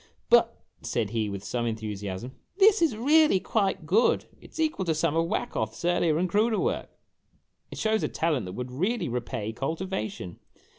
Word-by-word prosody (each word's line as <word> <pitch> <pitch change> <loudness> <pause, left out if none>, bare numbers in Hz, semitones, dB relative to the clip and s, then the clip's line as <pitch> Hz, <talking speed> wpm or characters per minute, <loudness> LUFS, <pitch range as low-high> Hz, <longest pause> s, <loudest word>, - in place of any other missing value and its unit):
"But," - - +4 0.2
said 110 -4 -2
he, 110 -2 -1
with 100 -1 -6
some 120 +3 -2
enthusiasm, 105 0 -4 0.3
"this 405 -1 +6
is 310 -10 +2
really 300 -2 +4
quite 195 -5 -1
good. 215 +9 +3 0.2
It - - -15
's - - -11
equal 310 -10 0
to 160 -2 +1
some 160 0 0
of 165 0 +2
Wacoth's 110 +1 -3
earlier 175 -3 +2
and 180 +2 +1
cruder 215 +5 +2
work! 470 +5 -1 0.8
It - - -9
shows 220 0 +1
a - - 0
talent 150 - -1
that 90 - -6
would 125 +4 -5
well 190 - 0
repay 115 -3 -3
cultivation 135 - -4
160 Hz, 170 wpm, -27 LUFS, -, 0.8 s, this